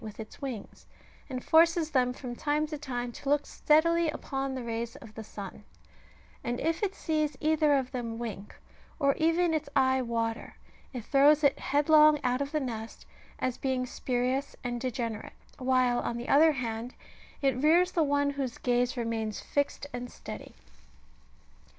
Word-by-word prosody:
with 215 0 -9
its 220 +5 -9
wings, 255 -7 -7 0.4
and 255 -1 -4
forces 330 0 +4
^ - - -24
them 250 -3 +2
from 250 -1 -7
time 295 +3 0
to 305 0 -5
time 245 -5 -4
to 275 - -6
look 290 0 +2
steadily 335 +2 +3
upon 270 -3 -3
the 255 - -4
rays 230 0 -4
of 220 -2 -12
the 220 - -7
sun; 205 -1 -9 0.8
and 240 -1 -2
if 325 +1 -1
it 400 -1 -1
sees 305 -3 -1
either 305 -1 +3
of 260 -2 -2
them 235 -3 -4
wink, 220 -4 -6 0.4
or 280 -3 +3
even 330 +1 +2
its 310 -2 -2
eye 260 -1 +3
water, 230 -1 -3 0.4
it 245 -4 -6
throws 290 +2 +5
it 280 -1 +3
headlong 300 +2 +5
out 250 +1 +1
of 280 0 -3
the 305 - 0
nest, 230 -5 -6 0.3
as 255 -1 -2
being 260 -2 0
spurious 255 +2 -2
and 240 -1 -3
degenerate, 235 -4 -3 0.3
while, 255 -1 +2
on 235 - -2
the 240 - -6
other 310 +2 +6
hand, 235 -2 -4 0.5
it 270 -2 +3
rears 345 +4 +4
the 335 - +1
one 285 -1 +2
whose 270 -4 -4
gaze 245 0 0
remains 225 -2 -2
fixed 285 0 -2
and 245 0 -5
steady. - - -9
265 Hz, 170 wpm, -29 LUFS, 240-300 Hz, 0.8 s, other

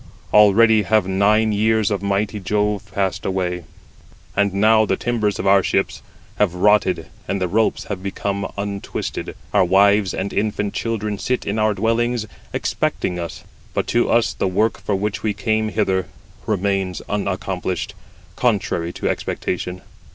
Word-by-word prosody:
Already 105 +1 +6
have 105 +1 +2
nine 105 +3 +3
years 110 0 +2
of 100 -2 -1
mighty 100 +1 -1
Jove 105 +1 -1
passed 95 0 -1
away, 90 -3 -2 0.7
and 100 0 +2
now 110 +3 +4
the 95 -3 +1
timbers 110 -4 0
of - - -4
our 100 0 +6
ships - - -1 0.4
have 95 -4 +2
rotted, 95 -3 +3 0.2
and 100 - -1
the 90 - 0
ropes 110 +5 +1
have 100 -3 -5
become 100 +1 -3
untwisted. 100 0 -4
87 - - -9 0.2
Our - - +5
wives 100 +2 +4
and 100 +1 -3
infant 105 -1 -1
children 105 -3 -2
sit 125 0 -1
in 105 +2 -1
our 110 -1 +2
dwellings 115 +2 0 0.3
expecting 90 -1 -1
us; 85 -1 -6 0.3
but - - 0
to 120 0 +2
us 115 0 +3
the - - -1
work 105 +4 +1
for 105 - -1
which 100 +1 -2
we 105 -2 -1
came 110 +1 0
hither 95 -2 0 0.4
remains 100 -2 -1
unaccomplished, 95 -2 -2 0.4
contrary 100 -7 0
to - - -3
expectation. 90 0 -3
100 Hz, 150 wpm, -21 LUFS, 95-110 Hz, 0.7 s, Already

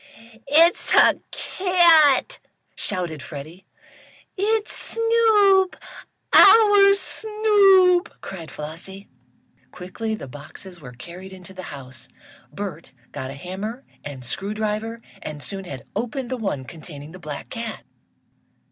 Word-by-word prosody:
"It's 330 +4 +4
a - - +5
cat!" 340 -7 +3 0.3
shouted 175 -6 -3
Freddie. 155 +8 -10 0.7
"It's 430 +2 -1 0.2
Snoop 435 -5 +3 0.6
our 410 -3 +7
Snoop!" 395 -4 +3
cried 170 -5 -9
Flossie. 170 +6 -9 0.6
Quickly 220 +5 -5
the 215 - -9
boxes 155 +6 -12
were 125 -3 -11
carried 175 +9 -11
into 190 0 -12
the 185 - -8
house. 130 -3 -11 0.4
Bert 170 -8 -7 0.2
got 130 - -6
a 135 - -8
hammer 195 - -6 0.2
and 135 -3 -8
screw 195 - -4
driver 220 +2 -3 0.2
and 150 -1 -7
soon 195 -1 -6
had 135 -7 -9
opened 245 +1 -4
the - - 0
one 195 - -3
containing 150 -1 -10
the 185 - -12
black 150 -4 -8
cat. 230 -2 -6
200 Hz, 115 wpm, -22 LUFS, -, 0.7 s, our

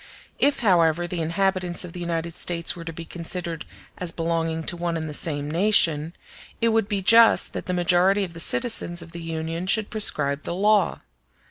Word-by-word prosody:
If, 285 -1 +2
however, 175 -5 +2
the 175 -1 -4
inhabitants 180 +2 -1
of 170 - -11
the 180 - -7
United 170 -1 -3
States 170 0 -2
were 170 - -9
to 165 - -5
be 165 +1 -9
considered 170 -1 -4 0.3
as 180 -2 -1
belonging 165 -1 -2
to 175 - -2
one 170 -1 -3
and 160 -1 -5
the 150 - -6
same 145 -1 0
nation, 165 -4 +2 0.4
it 230 - +2
would 225 -2 +1
be 200 -2 -2
just 230 +3 +5
that - - -6
the 180 - -2
majority 180 +3 +2
of 175 -3 -6
the 165 - -9
citizens 175 -5 0
of 165 - -14
the 170 0 -8
Union 165 +2 -5
should 215 +2 +1
prescribe 150 -9 +3
the 170 - -5
law. 210 +2 +2
170 Hz, 195 wpm, -23 LUFS, 165-190 Hz, 0.4 s, just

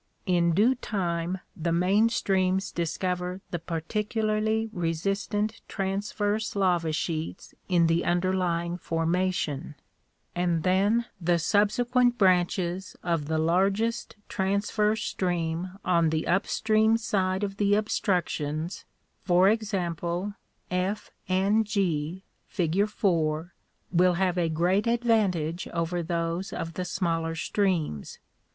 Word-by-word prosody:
In 170 -3 +2
due 225 +7 +5
time 180 -6 -2
the 170 0 -2
main 190 +6 +3
streams 190 -3 +1
discover 180 +2 -2
the 175 - -2
particularly 215 +6 -1
resistant 200 +5 -1
transverse 205 +2 -2
lava 175 -5 +2
sheets 160 +2 -3 0.2
in 175 -2 +4
the 165 +1 +2
underlying 175 -1 0
formation; 165 -3 -1 0.6
and 175 -2 0
then 200 +6 +2 0.2
the 175 +1 +2
subsequent 240 +7 +2
branches 185 -2 +1
of 165 -4 -1
the 160 0 0
largest 195 +10 +1
transverse 210 +2 0
stream 175 0 -2
on 170 -3 +3
the 155 0 -1
up 190 +3 +1
stream 220 +1 +3
side 190 -3 0
of 195 -1 -3
the 205 0 +2
obstruc 205 -3 +1
tions, 155 +4 -4 0.4
for 180 +1 +5
example, 185 -3 -1 0.4
F 185 +3 -2 0.2
and 195 +4 +3
G, 185 -4 -1 0.2
fig. 180 +3 +1
4, 165 -4 0 0.4
will 180 0 +4
have 180 -1 +1
a 170 -2 +1
great 180 +7 +1
advantage 205 -9 +1
over 170 +1 -2
those 170 +2 -2
of 165 0 -4
the 185 - -3
smaller 165 -3 -1
streams. 165 - -1
185 Hz, 115 wpm, -27 LUFS, 170-205 Hz, 0.6 s, due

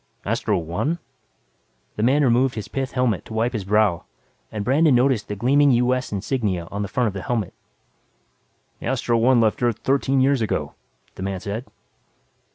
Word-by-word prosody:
"Astro 110 -1 0
One?" 90 - -2 1.0
The - - -3
man 135 +6 +3
removed 125 0 +3
his 105 -3 -5
pith 135 +4 -4
helmet 125 -8 0
to 110 - -8
wipe 115 +3 0
his 110 -4 -3
brow 100 -4 +2 0.5
and 105 -2 -4
Brandon 145 +2 +4
noticed 125 -4 +2
the 105 - -4
gleaming 140 +7 +3
US 125 +2 +1
insignia 100 -4 -2
on 100 - -3
the 100 - -2
front 120 +6 0
of 105 - -1
the 95 - -5
helmet. 110 -5 -2 1.3
"The - - -6
Astro 120 -3 +1
One 125 +1 +4
left 110 0 +1
Earth 120 -3 +1
thirteen 135 0 +1
years 135 -1 +3
ago," 110 - -2 0.4
the - - -10
man 95 0 -3
said. 105 +6 -5
115 Hz, 170 wpm, -22 LUFS, 105-130 Hz, 1.3 s, Brandon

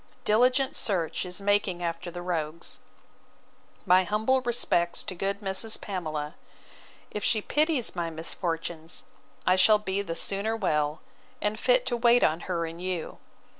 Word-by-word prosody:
Diligent 250 +5 +3
search 180 -3 0
is 180 +3 -3
making 200 -3 +1
after 170 +1 -3
the 175 0 -7
rogues. 165 -2 -2 1.1
My 185 0 +5
humble 220 +7 +1
respects 230 -8 +1
to - - -3
good 195 +3 -3
Mrs. 200 +3 0
Pamela: 155 -6 -4 0.8
if 210 - -4
she 220 - +3
pities 295 - +1
my 170 -1 -2
misfortunes, 165 0 -3 0.4
I 185 - +5
shall 210 +3 +6
be 200 -1 -2
the 170 -4 -5
sooner 200 +5 +1
well, 150 -7 0 0.4
and 210 +1 -1
fit 250 0 +3
to 240 -2 +1
wait 235 +1 +5
on 160 +2 +2
her 170 -2 0
and 165 +1 -8
you. 180 -3 -4
185 Hz, 145 wpm, -27 LUFS, 170-215 Hz, 1.1 s, shall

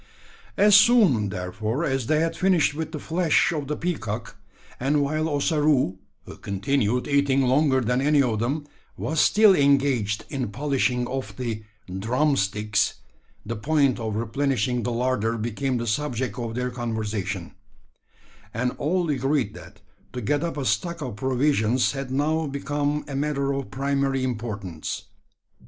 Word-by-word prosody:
As 205 0 +6
soon, 200 - +5
therefore, 105 - -3
as 135 -5 -1
they 155 0 +2
had 165 0 0
finished 180 -6 +2
with 155 +1 -4
the 160 - -4
flesh 165 +2 +2
of 150 -4 -3
the 150 - -2
peacock 120 -11 -4 0.4
and 145 +3 +2
while 155 +3 -1
Ossaroo, 145 - +1 0.3
who - - -10
continued 110 +4 0
eating 140 -2 +2
longer 130 +1 +3
than 125 +2 0
any 145 +1 +3
of 120 -6 +2
them, 140 +6 -1 0.3
was 160 0 -2
still 210 +3 +6
engaged 135 - +2
in 135 -4 -2
polishing 125 +1 0
off 130 +1 -5
the 115 -4 -4 0.4
"drumsticks" 105 -4 +1 0.5
the 115 +2 -3
point 140 +2 +1
of 110 -2 -3
replenishing 125 +1 0
the 120 - -2
larder 115 -2 0
became 120 +4 -2
the 120 - -3
subject 125 -1 -2
of 115 -1 -4
their 125 0 -2
conversation; 110 -4 -3 1.0
and 125 +2 0
all 175 +3 0
agreed 135 -5 0
that - - -13 0.3
to 125 - -4
get 145 +8 0
up 170 -2 -3
a 140 - -2
stock 170 +2 -1
of 125 -6 -5
provisions 130 -1 +1
had 135 -2 -5
now 155 +4 0
become 145 +1 -2
a 140 - -5
matter 140 -1 0
of 135 -1 -4
primary 135 -1 0
importance. 105 -9 -4
135 Hz, 145 wpm, -24 LUFS, 115-150 Hz, 1.0 s, As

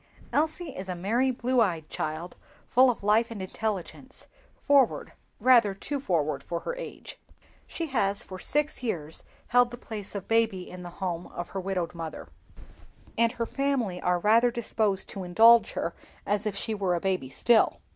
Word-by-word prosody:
Elsie 315 0 -1
is 190 0 -7
a 180 - -2
merry 225 +9 +1
blue 250 0 +1
eyed 165 -7 0
child, 155 +3 -4 0.3
full 255 +2 +5
of 230 -4 -2
life 215 +3 +3
and 225 -3 -7
intelligence, 215 +6 -5 0.3
forward—rather 255 -4 +2
too 280 +8 -4
forward 155 - 0
for 170 +4 -4
her 485 - -4
age. - - -8 0.5
She 335 - -4
has 205 -9 0
for 185 -1 -9
six 295 +5 0
years 160 -10 -3 0.3
held 245 0 +5
the 240 - -8
place 210 -4 -7
of 195 - -5
baby 225 -5 +1
in 180 0 -9
the 175 - -7 0.2
home 175 -1 -3
of 175 - -7
her 195 - -4
widowed 185 -2 -2
mother, 165 -2 -7 0.9
and 230 +1 +2
her 235 -2 -2
family 255 -10 -1
are 180 0 +2
rather 225 +6 +4
disposed 220 -4 -1
to 195 - -6
indulge 225 +6 +6
her - - -2 0.3
as 205 +1 0
if 205 - -2
she 220 - -2
were 195 -4 0
a - - -1
baby 185 -8 -1
still. 230 - +3
210 Hz, 170 wpm, -27 LUFS, 180-240 Hz, 0.9 s, indulge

